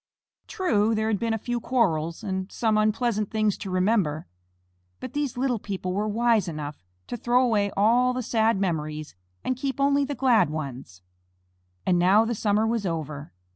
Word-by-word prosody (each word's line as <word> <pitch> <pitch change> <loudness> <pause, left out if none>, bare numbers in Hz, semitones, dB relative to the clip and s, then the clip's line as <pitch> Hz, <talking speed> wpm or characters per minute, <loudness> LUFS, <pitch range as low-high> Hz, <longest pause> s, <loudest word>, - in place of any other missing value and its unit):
True, 225 - +1
there 220 0 0
had 210 -3 0
been 230 -1 0
a - - -1
few 240 +2 -3
quarrels, 170 -11 0
and 190 0 -3
some 220 -2 +1
unpleasant 215 0 +1
things 215 -2 +1
to 195 - -6
remember, 185 -5 +1 0.7
but 255 - -7
these 285 -4 -2
little 250 -3 0
people 190 -3 -4
were 205 +3 -1
wise 225 -2 +2
enough 150 - -6 0.2
to - - -5
throw 245 +2 +2
away 210 -4 +1
all 240 +5 +4
the 250 0 -3
sad 225 -2 +1
memories 155 -5 -3 0.3
and 255 - -1
keep 270 +1 -3
only 280 +1 +3
the 280 +1 -3
glad 235 - +3
ones. 130 - -7 0.8
And 180 -1 +3
now 195 +5 +5
the 235 - -1
summer 210 0 +1
was 225 -1 0
over. 155 -5 -4
215 Hz, 175 wpm, -25 LUFS, 180-240 Hz, 0.8 s, now